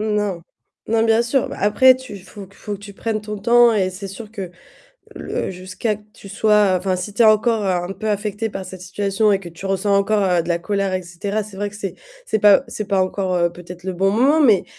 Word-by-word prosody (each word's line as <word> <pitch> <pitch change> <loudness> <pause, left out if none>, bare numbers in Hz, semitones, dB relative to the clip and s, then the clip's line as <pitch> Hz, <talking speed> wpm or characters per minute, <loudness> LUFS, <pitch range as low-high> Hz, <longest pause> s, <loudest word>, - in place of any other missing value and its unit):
Mmh. 215 - -2
Non, 195 -5 -2 0.5
non 225 0 +2
bien 225 0 +3
sûr. 240 +2 0
Après 215 +6 +5
tu 260 -4 -10
il 195 - -10
faut 200 0 -11
il - - -21
faut 210 - -7
que 195 - -8
tu 200 0 -10
prennes 220 +1 -2
ton 210 0 -6
temps 235 +3 +5
et 190 -4 +1
c'est 195 +2 -7
sûr 205 +3 -9
que 195 -5 -6 0.6
le - - -4
jusqu'à 185 +4 -3
que 210 - -19
tu 200 - -13
sois 210 -1 +3
enfin 185 0 -1
si 185 +3 -6
tu 235 - +3
es - - +6
encore 220 0 +3
un 180 -1 -1
peu 215 +2 -3
affecté 210 +2 -2
par 195 -1 -6
cette 185 -1 -10
situation 200 +3 0
et 195 - +1
que 175 - -9
tu 170 +3 -12
ressens 195 +1 0
encore 195 -4 +2
de 170 - -9
la 170 - +1
colère 195 +2 -1
et 185 - -1
cetera. 200 +5 -3
C'est 205 -1 -12
vrai 205 +1 -3
que 210 - -12
c'est 195 -2 -5 0.3
c'est 220 - 0
pas 205 -1 +6
c'est 215 - -4
pas 195 -2 +1
encore 185 -2 0
peut-être 180 0 -11
le 190 -1 -3
bon 195 +2 +2
moment 270 +9 +3
mais 215 -8 +4
200 Hz, 245 wpm, -20 LUFS, 185-215 Hz, 0.6 s, es